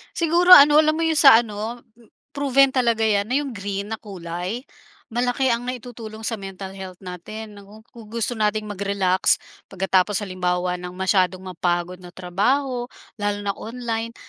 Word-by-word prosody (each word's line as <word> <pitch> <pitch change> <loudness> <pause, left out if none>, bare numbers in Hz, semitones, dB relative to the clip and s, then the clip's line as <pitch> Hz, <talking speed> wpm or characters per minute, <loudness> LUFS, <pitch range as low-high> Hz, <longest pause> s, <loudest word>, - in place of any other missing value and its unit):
Siguro 350 +2 +7
ano, 295 +1 +7
alam 310 0 +3
mo 330 - -1
'yong 320 -1 +2
sa 240 -5 +8
ano, 220 +2 -6 0.5
proven 275 -1 +3
talaga 235 -4 +1
'yan 205 -1 +1
na 255 - -1
'yong 285 -1 -1
green 200 -1 -5
na 220 - -4
kulay 185 +3 -6 0.5
malaki 245 +2 +1
ang 240 +1 -4
naitutulong 230 -3 -8
sa 230 - -1
mental 195 0 -8
health 190 -2 -9
natin. 205 +4 -8
Naku, 210 +2 -15
kung 230 -2 -13
gu 235 - -6
gusto 245 - -1
nating 215 -1 0
mag-relax 200 -2 +1 0.3
pagkatapos 190 +1 +1
halimbawa 180 -1 -2
ng 180 0 -6
masyadong 185 0 +1
mapagod 180 0 -2
na 180 -1 -12
trabaho 245 +8 -1 0.3
lalo 205 0 -1
na 200 - 0
online, 230 -1 -4
215 Hz, 160 wpm, -22 LUFS, 190-245 Hz, 0.5 s, sa